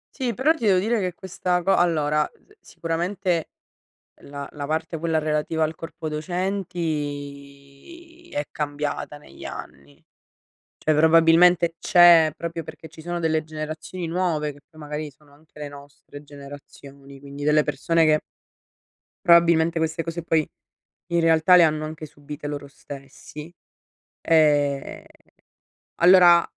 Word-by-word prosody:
Sì, 255 -4 -2
però 275 +8 +3
ti 315 - -7
devo 195 -3 +4
dire 225 +5 0
che 180 -2 -3
questa 180 0 -2
co 195 - +2
allora, 150 -3 +1
ehm, - - -30
si - - -18
sicuramente 170 0 -2 0.7
la 140 0 -8
la 145 -1 -6
parte 160 +2 -3
quella 160 0 0
relativa 155 +1 -1
al 155 +1 -3
corpo 165 0 -7
docenti 155 - -6
è 145 - -3
cambiata 145 0 -4
negli - - -14
anni; 70 +1 -10 0.8
cioè 155 - 0
probabilmente 165 +2 +4
c'è 170 -3 +6
proprio 170 0 -5
perché 160 +1 -11
ci 160 +1 -14
sono 175 +1 -4
delle 160 -1 0
generazioni 155 +3 -6
nuove, 165 -3 -1
che 145 - -18
poi 155 - -18
magari 150 0 -5
sono 140 +1 -25
anche 150 +1 -20
le 145 - -6
nostre 145 0 -13
generazioni, 140 -1 -13
quindi 140 +1 -9
delle 150 0 +3
persone 160 +3 +1
che 155 0 +3 1.1
probabilmente 170 -1 +4
queste 160 +1 -1
cose 165 +1 -5
poi 160 -2 0 0.6
in 170 -1 0
realtà 165 +2 +4
le 180 - +7
hanno 155 -1 +1
anche 155 0 -8
subite 145 0 -9
loro 145 -1 -6
stessi. 140 +3 -11 0.7
Ehm, 145 -4 +1 0.9
allora 175 -1 +6
160 Hz, 135 wpm, -23 LUFS, 145-170 Hz, 1.1 s, le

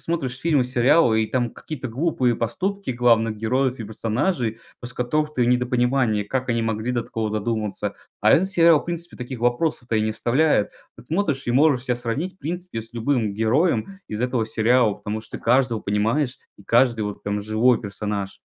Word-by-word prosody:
смотришь 135 -7 -3
фильмы 150 -3 +2
и - - -2
сериалы 125 -2 +3
и - - -1
там 120 -2 0
какие-то 135 -1 -7
глупые 130 -1 +1
поступки 195 - -2
главных 115 -3 +2
героев 130 +4 0
и 115 - -5
персонажей, 115 - -1 0.2
после 120 -1 -6
которых 150 +5 -1
ты 125 - +1
в - - 0
недопонимании, 125 -2 +2
как 130 +3 -3
они 115 -1 +1
могли 110 +2 -2
до 120 -1 0
такого 110 -1 -3
додуматься. 105 -1 -2 0.3
А 110 - +5
этот 190 +4 +3
сериал 170 -4 +5
в - - -12
принципе 170 0 -6
таких 125 -1 -7
вопросов-то 120 0 0
и - - +2
не 110 0 0
оставляет. 125 +1 +2 0.3
Вот - - -15
смотришь 155 -7 -1
и - - 0
можешь 135 -1 +3
себя 125 - 0
сравнить 125 +10 -3
в - - -45
принципе 175 -4 -5
с 115 +2 -12
любым 115 -2 0
героем 130 - +1
из 105 - -4
этого 125 -2 0
сериала, 115 0 +3
потому 105 +2 -5
что 110 - -9
каждого 120 -1 +2
понимаешь 115 +7 0 0.2
и 100 - -16
каждый 115 0 +3
вот 105 -1 -5
прям 105 0 -2
живой 110 +3 +3
персонаж. 100 -1 -4
120 Hz, 190 wpm, -23 LUFS, 110-135 Hz, 0.3 s, А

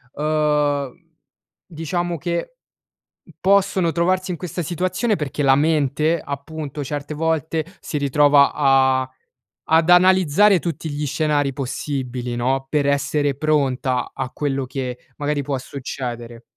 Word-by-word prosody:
uhm, 150 -2 +1 0.7
diciamo 175 +1 -3
che 170 - -3 0.9
possono 190 -3 +3
trovarsi 185 +2 0
in 170 - -4
questa 175 +1 -5
situazione 185 - -1
perché 145 -1 -3
la 135 -1 +5
mente, 155 +1 +1
appunto, 145 0 -6
certe 145 +2 -4
volte, 160 0 -1 0.2
si 150 - -4
ritrova 145 0 +4
a 130 -2 +3 0.6
ad 165 +2 +5
analizzare 185 +2 +5
tutti 165 -1 -4
gli 145 0 -3
scenari 145 -1 0
possibili, 125 -2 -4
no, 130 +3 0
per 145 -2 +1
essere 140 0 +1
pronta 135 -4 0
a 130 -1 -4
quello 135 -2 -2
che, 125 -1 -4 0.2
magari, 145 -1 -1
può 140 -1 -2
succedere. 120 -3 -7
145 Hz, 120 wpm, -21 LUFS, 135-165 Hz, 0.9 s, la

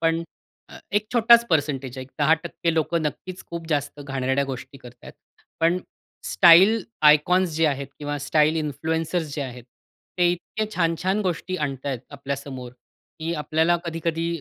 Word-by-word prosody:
पण 165 0 +1 0.7
एक 210 +1 +1
छोटाच 235 0 +6
पर्सेंटेज 140 -5 0
आहे. 130 - -5
एक 130 - -22
10% 165 +2 +1
लोकं 160 +1 0
नक्कीच 180 +5 -5
खूप 170 -1 -6
जास्त 145 -1 -2
घाणेरड्या 135 0 -1
गोष्टी 130 0 -7
करत 125 -1 -13
आहेत. - - -11 0.5
पण 170 +2 +3 0.5
स्टाईल 190 +6 +6 0.2
आयकॉन्स 160 +5 +5
जे 160 - +3
आहेत 140 -2 -1
किंवा 145 0 -3
स्टाईल 150 +2 +2
इन्फ्लुएंसर्स 160 +1 -2
जे 145 - -2
आहेत, 125 -2 -8 0.5
ते 175 - +4
इतके 180 +5 -3
छान-छान 180 +4 0
गोष्टी 185 0 -2
आणतायत 135 -3 -3
आपल्यासमोर, 140 -2 -6 0.5
की 165 +1 -2
आपल्याला 160 +3 +1
कधी-कधी 165 0 -2
160 Hz, 140 wpm, -24 LUFS, 140-170 Hz, 0.7 s, छोटाच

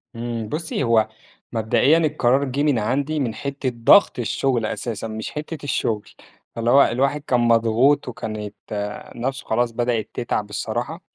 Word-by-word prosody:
إمم، 115 -2 -4
بُصّي، 160 -2 -2
هو 115 -3 +3 0.5
مبدئيًا 115 +7 +3
القرار 140 -4 +2
جِه 140 +2 -1
من 145 -6 +2
عندي 140 +8 -1
من 120 -6 -1
حتة 140 -1 -3
ضغط 120 +8 +5
الشغل 120 0 0
أساسًا، 115 0 -4
مش 110 0 -5
حتة 150 0 -6
الشغل، 110 -6 -1 0.5
فاللي 115 +1 0
هو 140 +1 +7
الواحد 135 +4 0
كان 125 -4 +1
مضغوط 115 +4 +3
وكانت 110 -3 -5 0.6
نَفْسه 135 +3 -3
خلاص 120 +1 +1
بدأَت 120 -1 -1
تتعب 105 -3 -2
الصراحة، 120 - -4
120 Hz, 145 wpm, -22 LUFS, 115-140 Hz, 0.6 s, هو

